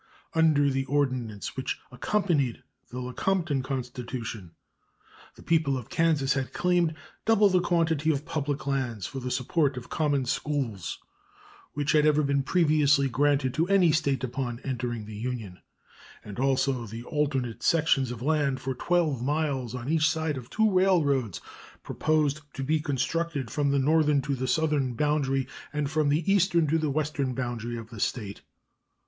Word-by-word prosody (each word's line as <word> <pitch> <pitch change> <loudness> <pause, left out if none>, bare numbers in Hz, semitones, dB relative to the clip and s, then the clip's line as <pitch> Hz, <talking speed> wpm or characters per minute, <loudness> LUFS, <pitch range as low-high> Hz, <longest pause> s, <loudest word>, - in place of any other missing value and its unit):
Under 155 -3 +4
the 135 0 -1
ordinance 130 -7 -1
which 130 - -3
accompanied 145 - 0 0.3
the 125 - -6
Lecompton 145 +4 -1
constitution 125 -5 -5 0.9
the - - -15
people 160 -5 +2
of 125 - -9
Kansas 155 -5 +2
had 135 -1 -3
claimed 175 -3 +1 0.3
double 215 -2 +4
the 185 -1 +3
quantity 160 -3 +1
of 145 -1 0
public 145 -2 -3
lands 130 -8 -2
for 135 - -5
the 125 0 -4
support 135 +2 0
of 125 0 -8
common 145 -4 +1
schools 125 -8 -2 0.8
which 145 0 0
had 150 -1 +4
ever 150 0 +3
been 140 0 +1
previously 150 -3 +3
granted 140 0 +1
to 165 +4 +1
any 190 -4 +4
State 140 -4 0
upon 120 -1 -3
entering 120 -4 -3
the 110 - -9
Union, 110 -5 -5 0.7
and 105 +1 -8
also 135 -2 +1
the 115 +3 -7
alternate 135 -5 -1
sections 150 -5 +2
of 120 -1 -6
land 145 -3 +1
for 130 - -3
12 155 -2 0
miles 135 -3 -1
on 125 0 -6
each 155 0 +3
side 160 0 -1
of 125 -2 -8
two 220 -1 +2
railroads 150 - +2 0.4
proposed 155 -2 0
to 135 - -3
be 155 +3 +1
constructed 150 -2 -2
from 145 0 +1
the 140 - +2
northern 150 +1 +3
to 140 +1 -2
the 130 -1 -2
southern 145 -5 +1
boundary 135 -1 +1 0.2
and 145 -1 -2
from 155 -2 +2
the 150 +4 +2
eastern 175 -4 +3
to 160 +2 +1
the 155 -1 0
western 145 -3 -1
boundary 120 -2 -3
of 115 0 -9
the 115 - -9
State. 100 -2 -3
140 Hz, 160 wpm, -27 LUFS, 125-155 Hz, 0.9 s, Under